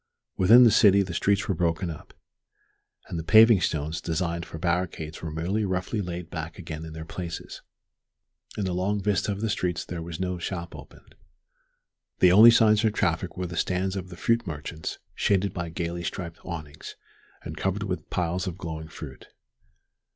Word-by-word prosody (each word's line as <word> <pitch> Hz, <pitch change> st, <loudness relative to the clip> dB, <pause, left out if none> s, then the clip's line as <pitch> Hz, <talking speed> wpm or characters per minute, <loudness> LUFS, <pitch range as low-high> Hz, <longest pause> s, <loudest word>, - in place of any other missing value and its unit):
Within 115 Hz, +7 st, +7 dB
the 115 Hz, -, +7 dB
city 100 Hz, -1 st, +6 dB
the 90 Hz, -2 st, -6 dB
streets 100 Hz, +4 st, +1 dB
were 100 Hz, -, +1 dB
broken 85 Hz, 0 st, -1 dB
up, 80 Hz, -, -12 dB, 0.9 s
and 85 Hz, -, -4 dB
the -, -, -4 dB
paving 110 Hz, +2 st, +7 dB
stones 80 Hz, -1 st, -1 dB
designed 85 Hz, 0 st, -2 dB
for -, -, -8 dB
barricades 85 Hz, -2 st, -2 dB
were 80 Hz, -, -4 dB
merely 85 Hz, +8 st, -1 dB
roughly 95 Hz, +2 st, -2 dB
laid 90 Hz, -2 st, -6 dB
back 80 Hz, -1 st, -6 dB
again 80 Hz, -3 st, -7 dB
in 80 Hz, -, -9 dB
their 80 Hz, 0 st, -7 dB
places. 85 Hz, -1 st, -7 dB, 1.0 s
In 105 Hz, -, -1 dB
the 90 Hz, -, -1 dB
long 95 Hz, +3 st, 0 dB
vista 100 Hz, 0 st, 0 dB
of 100 Hz, 0 st, -4 dB
the 110 Hz, -, 0 dB
streets 90 Hz, -1 st, -2 dB
there 85 Hz, -2 st, -5 dB
was 80 Hz, -1 st, -7 dB
no 90 Hz, -1 st, -2 dB
shop 85 Hz, -1 st, -5 dB
open. -, -, -13 dB, 1.1 s
The 90 Hz, -, +6 dB
only 110 Hz, +5 st, +9 dB
signs 110 Hz, -1 st, +5 dB
of 110 Hz, -2 st, +2 dB
traffic 85 Hz, -3 st, -1 dB
were 90 Hz, -, -2 dB
the 85 Hz, -1 st, -6 dB
stands 95 Hz, +3 st, -1 dB
of 95 Hz, -1 st, -5 dB
the 85 Hz, -, -10 dB
fruit 115 Hz, 0 st, +1 dB
merchants 80 Hz, +1 st, -5 dB, 0.2 s
shaded 100 Hz, 0 st, +1 dB
by 85 Hz, -2 st, -4 dB
gayly 85 Hz, +1 st, -4 dB
striped 85 Hz, -1 st, -6 dB
awnings, 80 Hz, -4 st, -8 dB, 0.5 s
and -, -, -6 dB
covered 95 Hz, +2 st, -1 dB
with 90 Hz, -4 st, -4 dB
piles 90 Hz, +2 st, -1 dB
of 90 Hz, -1 st, -4 dB
glowing 80 Hz, -3 st, -6 dB
fruit. -, -, -10 dB
90 Hz, 180 wpm, -26 LUFS, 80-100 Hz, 1.1 s, only